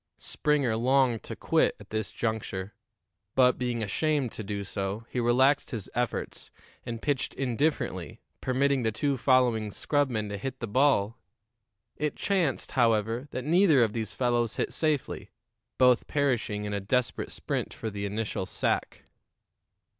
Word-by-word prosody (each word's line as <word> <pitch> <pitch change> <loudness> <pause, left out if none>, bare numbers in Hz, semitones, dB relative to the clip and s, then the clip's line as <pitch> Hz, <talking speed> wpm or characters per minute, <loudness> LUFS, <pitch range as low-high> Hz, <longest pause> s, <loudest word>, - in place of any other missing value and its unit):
Springer 140 -6 0
longed 125 0 +2
to - - -7
quit - - +2
at - - -15
this 110 -2 -2
juncture, 105 -3 -3 0.6
but, 125 -1 +4
being 120 -2 -1
ashamed 140 +4 0
to 110 - -7
do 100 0 -3
so, 100 +3 -4
he 125 - -1
relaxed 130 +4 +3
his 110 -6 -5
efforts 120 0 -3 0.3
and 115 -1 -6
pitched 145 -3 -1
indifferently, 135 +4 -1 0.2
permitting 135 +1 +1
the 110 -2 +1
two 140 +6 0
following 125 -4 +3
scrubmen 125 -2 0
to 100 -1 -5
hit 130 +4 -5
the - - -3
ball. 115 -2 +2 0.8
It 150 -1 -1
chanced, 180 -9 0
however, 115 +1 +1
that 130 -2 -5
neither 160 -5 +5
of 110 -2 0
these 110 -2 -3
fellows 120 -2 +1
hit - - -2
safely, 155 -4 -1 0.5
both 125 -2 +4
perishing 120 -7 0
in 105 - -3
a 100 - 0
desperate 120 +5 -1
sprint - - -3
for 110 - -5
the 100 0 -3
initial 105 -2 -3
sack. - - -1
120 Hz, 145 wpm, -28 LUFS, 110-135 Hz, 0.8 s, neither